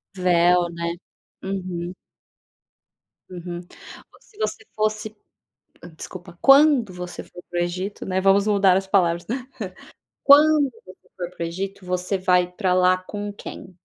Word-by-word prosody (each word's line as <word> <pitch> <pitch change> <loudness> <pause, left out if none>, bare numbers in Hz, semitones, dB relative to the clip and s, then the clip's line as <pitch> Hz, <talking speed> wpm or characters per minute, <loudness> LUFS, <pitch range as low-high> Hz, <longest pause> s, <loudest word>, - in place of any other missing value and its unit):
Véu, 175 -1 +3
né 170 0 -3 0.5
Uhum. 185 -2 -4 1.4
Uhum 175 -1 -6 0.5
Ou - - -20
se 430 - -24
você - - -3
fosse, 215 0 -1 0.7
hã, 165 - -11
desculpa, 175 +1 -10
quando 275 -7 +6
você 180 0 -7
for 175 0 -13
para 175 0 -1
o - - +2
Egito, 185 +4 -4
né, 190 0 0
vamos 195 +1 +4
mudar 200 -3 +4
as 195 - -1
palavras. 175 -3 +1 1.0
Quando 290 -1 +6
você 185 0 -17
for 175 -1 -5
para 170 - -5
o - - -1
Egito, 190 +3 -5
você 180 +2 -1
vai 180 -1 +2
pra 180 0 -1
lá 185 0 +4
com 205 +2 -6
quem? 185 -2 -10
185 Hz, 140 wpm, -23 LUFS, 175-200 Hz, 1.4 s, quando